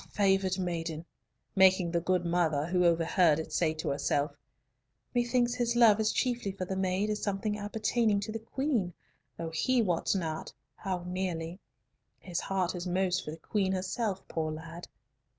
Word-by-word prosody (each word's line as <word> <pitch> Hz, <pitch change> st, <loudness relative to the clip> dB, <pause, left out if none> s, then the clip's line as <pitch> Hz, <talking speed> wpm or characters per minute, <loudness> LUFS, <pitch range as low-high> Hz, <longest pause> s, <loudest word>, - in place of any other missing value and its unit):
favoured 195 Hz, -2 st, +2 dB
maiden," 165 Hz, -3 st, -3 dB, 0.5 s
making 190 Hz, -2 st, +5 dB
the 170 Hz, 0 st, +1 dB
good 180 Hz, 0 st, +1 dB
mother, 165 Hz, -4 st, +1 dB
who 180 Hz, +1 st, +1 dB
overheard 165 Hz, -1 st, +4 dB
it, 160 Hz, -, -5 dB
say 165 Hz, -3 st, +2 dB
to 155 Hz, 0 st, -3 dB
herself, 145 Hz, +1 st, 0 dB, 0.8 s
"Methinks 240 Hz, 0 st, +2 dB
his 240 Hz, -1 st, 0 dB
love 225 Hz, -3 st, +6 dB
is 215 Hz, 0 st, +2 dB
chiefly 245 Hz, -5 st, 0 dB
for 190 Hz, -1 st, -5 dB
the 190 Hz, -, -3 dB
maid 190 Hz, +2 st, 0 dB
as 210 Hz, -, -2 dB
something 205 Hz, +1 st, -1 dB
appertaining 215 Hz, +1 st, +1 dB
to 215 Hz, -, -4 dB
the 225 Hz, -, -4 dB
Queen, 225 Hz, -, -1 dB, 0.4 s
though 165 Hz, -1 st, -4 dB
he 250 Hz, +11 st, +2 dB
wots 180 Hz, -4 st, +1 dB
not 160 Hz, -4 st, -3 dB, 0.3 s
how 185 Hz, -3 st, -3 dB
nearly. 180 Hz, -1 st, -3 dB, 0.6 s
His 180 Hz, -2 st, -4 dB
heart 185 Hz, -2 st, -1 dB
is 180 Hz, 0 st, -4 dB
most 180 Hz, 0 st, +1 dB
for -, -, -7 dB
the 155 Hz, -, -6 dB
Queen 190 Hz, +3 st, 0 dB
herself, 190 Hz, +2 st, -2 dB
poor 160 Hz, -1 st, -2 dB
lad." 165 Hz, +2 st, -8 dB
185 Hz, 165 wpm, -30 LUFS, 170-210 Hz, 0.8 s, love